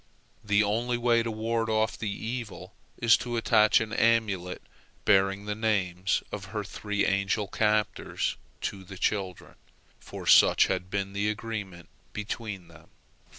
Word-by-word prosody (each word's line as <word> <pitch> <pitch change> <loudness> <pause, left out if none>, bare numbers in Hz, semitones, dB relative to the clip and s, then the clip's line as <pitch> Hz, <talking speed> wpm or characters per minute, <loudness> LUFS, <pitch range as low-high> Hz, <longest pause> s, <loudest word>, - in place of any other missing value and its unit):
The 105 0 +3
only 120 +4 0
way 120 -1 +3
to 115 - -3
ward 115 +1 -1
off 110 0 +1
the 110 - -4
evil 115 +2 -6 0.2
is 115 -1 +5
to 120 -1 -4
attach 110 -2 +4
an 110 0 -4
amulet 110 -6 +1 0.4
bearing 100 0 +3
the 105 - -2
names 100 -4 0
of 100 -2 -5
her 105 +1 -4
three 105 +1 -2
angel 100 +1 0
captors 105 +1 0 0.3
to 95 -1 -4
the 95 +1 -10
children, 95 -2 -2 0.5
for - - -9
such - - +6
had 90 -1 -2
been 100 0 -3
the 100 +1 0
agreement 105 -6 -5 0.3
between 105 -3 -5
them. 85 -1 -17
105 Hz, 145 wpm, -28 LUFS, 95-110 Hz, 0.5 s, such